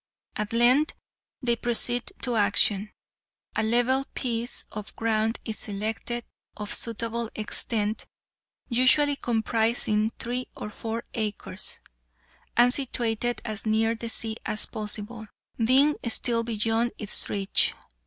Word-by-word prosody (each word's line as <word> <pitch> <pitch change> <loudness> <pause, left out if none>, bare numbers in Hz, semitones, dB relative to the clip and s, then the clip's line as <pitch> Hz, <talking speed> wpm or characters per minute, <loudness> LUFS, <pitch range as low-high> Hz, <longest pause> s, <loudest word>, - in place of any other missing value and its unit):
At 210 0 -3
length 250 +6 +4 0.5
they 240 -1 +2
proceed 240 +1 +4
to 245 -2 0
action. 205 0 +2 0.6
A - - +1
level 245 +4 +2
piece 235 -2 -2
of 210 0 -8
ground 225 0 0
is 220 -2 -2
selected, 220 +3 -3 0.3
of 210 -1 -3
suitable 230 0 -1
extent, 215 0 -1 0.6
usually 275 +4 +4
comprising 225 -2 +1
three 250 +2 -4
or 210 - -6
four 225 +2 -5
acres, 215 -2 -3 0.8
and 245 +1 +6
situated 240 -3 0
as 215 0 -3
near 220 +1 +2
the 230 0 -6
sea 225 -1 +1
as 215 - +3
possible, 215 +1 -2 0.4
being 275 +6 +4
still 230 0 +2
beyond 225 +1 0
its 210 -2 +1
reach. 200 -1 +2
230 Hz, 115 wpm, -26 LUFS, 215-240 Hz, 0.8 s, and